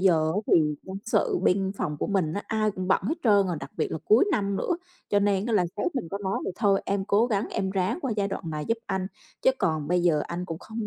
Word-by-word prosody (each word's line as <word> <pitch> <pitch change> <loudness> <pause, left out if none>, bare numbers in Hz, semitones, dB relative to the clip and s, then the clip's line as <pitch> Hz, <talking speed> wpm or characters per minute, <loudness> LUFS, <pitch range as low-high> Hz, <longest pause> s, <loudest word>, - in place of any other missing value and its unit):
giờ 160 -4 +3
á 205 - +1
thì 150 -2 +4
nhân 190 0 -7
sự 230 - +1
bên 190 +1 +2
phòng 150 - -2
của - - -2
mình 185 -6 0
á, 205 - -3
ai 215 -1 +1
cũng 185 -1 -5
bận - - +3
hết 260 +12 0
trơn 200 -3 +5
rồi, 175 - -2
đặc - - -8
biệt 160 - 0
là 160 - -2
cuối 220 - +5
năm 200 -8 0
nữa, 350 - 0 0.3
cho 205 - +3
nên 200 +1 +1
á 235 - -1
là 195 -4 +4
sếp 285 +10 -1
mình 245 -11 -3
có 200 - -3
nói 195 -1 -1
mình, - - -2
thôi 200 -3 +3
em 200 -1 0
cố 210 +4 +3
gắng 210 -3 -1
em 190 -1 -1
ráng 190 - 0
qua 265 -8 -1
giai 200 -1 +1
đoạn 175 -4 -5
này 150 -1 -3
giúp 230 0 +1
anh, 190 -1 -1 0.4
chứ - - +6
còn 155 -3 0
bây 180 0 +2
giờ 160 -4 +3
anh 175 +1 -4
cũng 165 -3 -5
không 220 +1 -5
195 Hz, 275 wpm, -26 LUFS, 175-210 Hz, 0.4 s, chứ